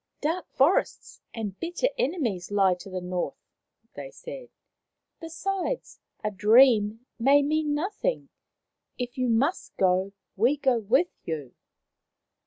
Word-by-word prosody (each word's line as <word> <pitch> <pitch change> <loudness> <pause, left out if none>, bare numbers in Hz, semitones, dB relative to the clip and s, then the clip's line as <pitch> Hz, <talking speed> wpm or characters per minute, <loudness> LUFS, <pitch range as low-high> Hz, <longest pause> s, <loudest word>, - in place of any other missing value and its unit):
" - - -52
Dark 325 +4 -1
forests 285 +8 +1
and 210 -4 -5
bitter 350 +9 -1
enemies 275 - -1
lie 195 -2 +3
to 180 +2 -9
the 185 -1 -4
north," 180 0 -3 0.6
they - - -8
said. - - -10 0.4
" - - -58
Besides, 380 +7 -3 0.2
a 210 - -1
dream 220 +1 +4
may 280 +4 +5
mean 300 0 0
nothing. 415 +10 -2 0.7
If 245 -1 -4
you 255 -1 +1
must 270 +10 0
go, 190 +1 +2 0.2
we 245 +9 +3
go 265 -4 +2
with 260 - +2
you." 150 -6 -5
255 Hz, 130 wpm, -26 LUFS, 205-330 Hz, 0.7 s, may